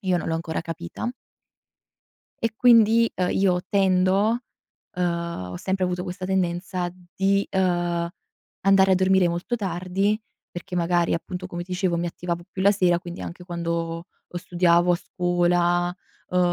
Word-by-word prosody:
io 185 -2 +1
non 165 - -4
l'ho 160 - 0
ancora 165 0 -3
capita. 165 - -5 1.3
E 225 -1 0
quindi, 230 -1 +5
uhm, 180 -1 0
io 185 -2 +2
tendo, 195 +3 +3 0.6
uhm 170 - -2
ho 90 - -5
sempre 190 - -1
avuto 180 0 -2
questa 185 0 -6
tendenza 180 -1 -1 0.2
di, 195 +1 +2
uhm, 175 -2 0 0.5
andare 195 0 +5
a - - +6
dormire 185 -1 +3
molto 175 +9 -2
tardi, 195 +2 -1 0.3
perché 175 +1 -6
magari 175 0 +2
appunto 180 +2 -5
come 175 -1 -5
dicevo 180 -1 -1
mi 170 +1 -1
attivavo 170 0 -4
più 190 - -4
la 200 - +6
sera, 180 -4 +2
quindi 175 0 -8
anche 175 +1 -8
quando 170 -1 -3 0.2
o - - -7
studiavo 175 0 +3
a - - +2
scuola, 175 0 +1 0.3
uhm, 180 - 0
180 Hz, 150 wpm, -24 LUFS, 175-190 Hz, 1.3 s, a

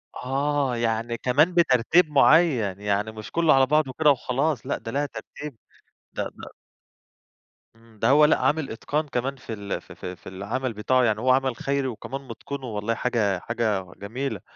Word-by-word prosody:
آه، 140 0 -1
يعني 115 0 -1
كمان 150 +10 +2
بترتيب 165 +1 +4
معيّن، 135 - +4
يعني 105 +1 -1
مش 110 +1 -9
كله 165 -2 +4
على 135 0 +5
بعضه 150 0 +2
وكده 150 +3 +3
وخلاص، 135 +1 -1
لأ - - -1
ده 115 0 -7
لها 145 +1 0
ترتيب 145 -2 -9 0.6
ده - - -2
ده - - -9 1.3
إمم، 115 -2 -22
ده - - +2
هو 150 +2 +7
لأ 150 - +3
عامِل 150 -3 0
إتقان 150 +7 -2
كمان 135 +1 -2
في 130 -3 -8
ال 100 -1 -4
في - - -14
في 90 0 -7
في - - -12
العمَل 115 +7 -3
بتاعه، 125 +5 +2
يعني 110 -2 +1
هو 130 +2 +2
عمل 130 -2 +2
خيري 140 0 -1
وكمان 130 +3 -6
مُتقِنه، 135 +3 -7
والله 110 0 -2
حاجة 105 -7 0
حاجة 105 -6 -2
جميلة، 110 0 -4
125 Hz, 175 wpm, -25 LUFS, 110-140 Hz, 1.3 s, هو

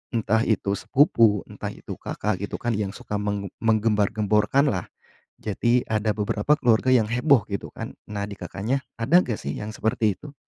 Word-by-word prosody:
entah 110 -1 +2
itu 100 -3 +1
sepupu, 115 - +3
entah - - -6
itu - - -8
Kakak, 105 -2 -2
gitu 100 - -4
kan, 120 - -2
yang 100 -1 -3
suka 105 - -4
menge 100 -2 -3
menggembar-gemborkan 110 +3 +2
lah. 90 -4 -3 0.5
Jadi 120 +4 0
ada 110 0 0
beberapa 105 +4 -1
keluarga 120 +1 +3
yang 115 -4 +4
heboh, 125 -1 +3
gitu 100 -2 -5
kan. - - -7 0.2
Nah, 100 -1 -3
di 100 - -7
Kakaknya 115 +8 -3 0.2
ada 170 +11 +4
nggak 115 -4 -3
sih, 70 - -4
yang 105 +1 -5
seperti 110 -2 0
itu? 145 -1 -11
110 Hz, 170 wpm, -24 LUFS, 105-120 Hz, 0.5 s, yang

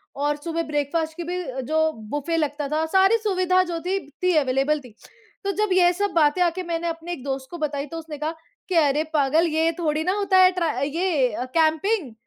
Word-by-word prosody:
और 290 +1 0
सुबह 330 +3 -3
ब्रेकफ़ास्ट 310 +1 -2
की 345 - -4
भी 360 +2 -3 0.2
जो 315 0 +2 0.2
बुफ़े 295 +5 -2
लगता 295 -2 -1
था, 310 +2 0
सारी 385 +6 +4
सुविधा 370 -3 +2
जो 345 -2 -4
थी 375 +3 -1 0.2
थी 365 0 +3
अवेलेबल 275 +2 +1
थी। 250 -5 -15 0.5
तो 395 - 0
जब 425 0 +1
ये 355 -1 +5
सब 405 +2 -1
बातें 315 +2 +3
आके 355 +1 +1
मैंने 340 -1 -3
अपने 330 +1 -5
एक 265 - -8
दोस्त 270 -1 -4
को 345 - -6
बताई 290 -3 -2
तो 330 - -7
उसने 315 -2 -7
कहा 310 +3 -3 0.3
कि 370 - -1
अरे! 300 -2 +3
पागल 305 +3 +3
ये 320 +1 +1
थोड़ी 310 -2 0
ना 365 +3 +1
होता 395 -2 +2
है 370 0 +7
ट्र 360 -2 -1 0.2
ये 295 - 0
अ, 245 - -3
कैम्पिंग। 320 - +1
325 Hz, 210 wpm, -23 LUFS, 295-360 Hz, 0.5 s, है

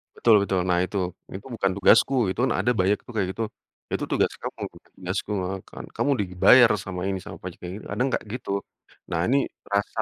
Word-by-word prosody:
Betul 115 -2 +5
betul. 95 -2 0
Nah 90 -1 +3
itu, 100 +2 -3 0.3
"Itu 95 +2 -8
bukan 95 -3 +1
tugasku," 100 +7 +5 0.2
itu 110 - -7
kan 130 - +2
ada 125 - +2
banyak 95 +3 +3
tuh 120 - -9
kayak 95 -4 +1
gitu. 115 - -3 0.5
"Itu - - -1
tugas - - +2
kamu, - - -6
bukan - - -19
tugasku," 95 +3 -3
heeh 95 +1 -3
kan. - - -9
"Kamu 145 - 0
sudah 100 - 0
dibayar 120 +6 +7
sama 95 -2 -5
ini 95 -1 -1
sama - - -9
pajak," 90 -1 -8
kayak 90 - -5
gitu. - - -13
Kadang 130 +2 0
enggak - - -1
gitu. 120 -1 -5 0.6
Nah 85 - 0
ini, 135 +3 +3 0.3
rasa, 100 +2 0
100 Hz, 215 wpm, -25 LUFS, 95-115 Hz, 0.6 s, dibayar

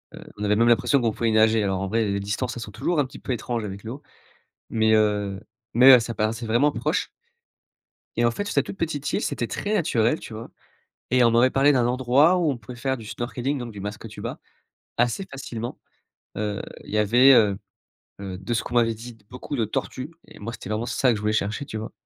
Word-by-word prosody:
Heu, - - -10 0.2
on 105 - -5
avait 105 0 +2
même 115 +2 +3
l'impression 120 +4 +4
qu'on 115 -2 +1
pouvait 115 +1 0
nager, 110 0 +4
alors 95 -1 -1
en 95 - -2
vrai 110 +3 +1
les 100 -1 -1
distances 105 +5 -3
elles - - -6
sont 105 - -9
toujours 170 - -1
un 145 - +3
petit 130 - -11
peu - - -5
étranges 120 -1 -3
avec 100 -1 -7
l'eau 120 +6 -7 0.7
mais 110 -1 +2
heu, 105 -2 +1 0.3
mais 125 +3 +7
heu, 125 - +5
ça 115 +1 -4
paraissait 110 +2 -2
vraiment 120 +7 +3
proche - - -1 1.1
et 120 - +2
en 120 - +4
fait 205 - -4
sur 205 - -4
cette - - +2
toute - - -7
petite 150 -3 -2
île - - 0
c'était 120 - -2
très 205 - -3
naturel, 145 - +2
tu - - -10
vois? 110 +2 -8 0.6
Et 125 -1 +4
on 115 - +5
m'avait 120 +3 +4
parlé 140 +2 +4
d'un 125 -3 +2
endroit 130 +7 +4
où 165 -4 +2
on 130 - -3
pouvait 120 +2 -10
faire 130 +2 -1
du 110 - -10
snorkeling 125 +5 -3
donc 120 -2 -6
du 100 - -9
masque 105 +2 -6
tuba - - -7 0.6
assez 120 +11 +1
facilement. 120 -3 -6 0.6
Heu, 105 -1 -2 0.2
il - - -12
y 105 - 0
avait, 120 +6 +6
heu 105 -5 +4 0.6
heu, 95 -2 -5
de 95 +6 -4
ce 115 - 0
qu'on 120 - -6
m'avait 115 -1 +3
dit: 115 +1 -10
«beaucoup 125 +3 -6
de 115 -4 0
tortues» 130 +6 -4 0.2
et - - -15
moi 115 +3 -6
c'était - - -9
vraiment 110 +2 -1
ça 130 0 +2
que - - +1
je - - -7
voulais 105 0 0
chercher, 110 +5 -1
tu 110 - -6
vois? 110 +1 -6
115 Hz, 235 wpm, -24 LUFS, 110-130 Hz, 1.1 s, mais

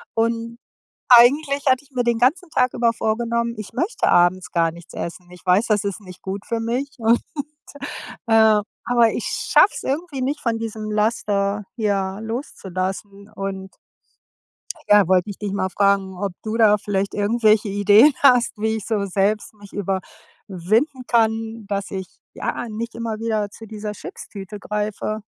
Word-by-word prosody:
und 230 0 -1 0.5
eigentlich 280 +4 +5
hatte 260 +1 +2
ich 285 - -27
mir 250 -1 0
den 235 -1 +1
ganzen 320 +9 +1
Tag 250 -4 +1
über 235 -1 +2
vorgenommen, 235 +1 -1
ich 215 - -7
möchte 375 +8 0
abends 175 +1 +3
gar 165 -1 +2
nichts 170 0 -14
essen. 175 +1 -6
Ich 180 0 -15
weiß, 190 +6 +4
das 210 -2 +2
ist 200 +1 -3
nicht 185 -3 -13
gut 195 +1 -5
für 230 - -1
mich 245 +5 -2
und, 230 +1 +3 1.1
äh, 220 -1 +5 0.3
aber 235 -2 +4
ich - - -3
schaffe - - +3
es - - -6
irgendwie 285 0 -3
nicht 280 +4 -1
von 230 -3 -1
diesem 220 -1 -5
Laster, 210 -1 0
ja, 200 -3 -1
loszulassen 200 -4 -5
und 195 -2 -6 1.2
ja, 205 -2 +7
wollte 185 +1 +2
ich 200 - -7
dich 205 -2 -4
mal 190 -1 -1
fragen, 200 0 +1
ob 195 +1 -3
du 220 0 -3
da 210 -2 +5
vielleicht 200 -1 -2
irgendwelche 215 0 +2
Ideen 205 +7 +6
hast, 245 -4 +5
wie 220 +1 -1
ich 205 - -9
so 215 -3 0
selbst 200 +2 0
mich 205 -2 -16
überwinden 205 - -2
kann, 225 -1 0
dass 200 0 -3
ich, 190 -1 -4 0.3
ja, - - -4
nicht 225 +2 -5
immer 230 -2 -4
wieder 215 -2 -1
zu 225 - -12
dieser 210 0 -6
Chips-Tüte 205 -1 -9
greife? 210 +1 -3
215 Hz, 160 wpm, -21 LUFS, 200-235 Hz, 1.2 s, ja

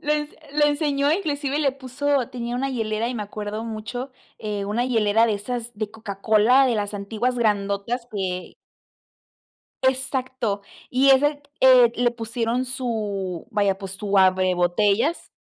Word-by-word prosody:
lo 300 - 0
ens 295 0 -1 0.2
lo 295 0 +3
enseñó, 290 -1 +1
inclusive 290 -5 -1
le 280 -3 +3
puso 275 0 -1
tenía 240 -1 -4
una 270 +2 -1
hielera 225 -2 -1
y 250 - -4
me 215 - -3
acuerdo 210 +1 -5
mucho, 230 +4 -5 0.3
eh, 210 -2 -3
una 220 +4 -1
hielera 225 -2 +3
de 215 - +1
esas 235 +3 -5
de 210 0 -4
Coca-Cola, 220 +4 +3
de 245 - +1
las 205 -1 -2
antiguas 220 +5 -2
grandotas 210 +2 0
que 185 -3 -4 1.3
Exacto. 260 -5 0 0.3
Y 265 +2 +4
ese, 290 +2 +3 0.2
eh, 250 -3 +7
le 245 0 +2
pusieron 235 +1 -2
su 210 -8 -3
vaya, 200 -2 +1
pues 195 -1 -7
su 200 0 -2
abre 185 -1 +4
botellas, 200 - +1
230 Hz, 150 wpm, -23 LUFS, 205-260 Hz, 1.3 s, eh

